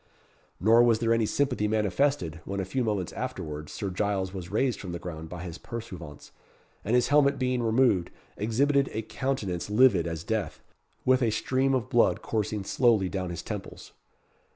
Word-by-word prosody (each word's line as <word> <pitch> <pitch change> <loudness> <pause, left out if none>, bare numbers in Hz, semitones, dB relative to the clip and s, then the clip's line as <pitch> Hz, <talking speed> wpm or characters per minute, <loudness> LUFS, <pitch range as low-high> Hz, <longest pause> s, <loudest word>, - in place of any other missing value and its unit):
Nor 115 +4 +6
was 120 -2 +4
there 115 0 +2
any 115 -2 +2
sympathy 125 -6 0
manifested, 105 - 0
when 100 +1 -4
a 95 - -1
few 130 +7 -1
moments 105 -6 -2
afterwards 75 0 -5
Sir 100 -2 -4
Giles 95 -1 -1
was 90 -3 -6
raised 130 +2 0
from 90 -3 -6
the - - -3
ground 80 -2 -7
by 90 +1 -6
the 85 -1 -8
pursuivants, 90 -11 -8 0.5
and 110 +4 +1
his 125 - +3
helmet 140 -1 +4
being 125 -1 0
removed, 115 -5 +2 0.3
exhibited 135 +6 +1
a 110 - -2
countenance 105 -9 -3
livid 105 -6 +4
as 80 -1 -4
death, 110 0 -2 0.5
with 130 0 +4
a 120 - +3
stream 130 +4 +1
of 125 -1 -1
blood 120 -2 +2
coursing 110 -2 -2
slowly 110 -3 +2
down 95 -2 -3
the 85 - -4
temples. - - -7
110 Hz, 175 wpm, -27 LUFS, 90-125 Hz, 0.5 s, Nor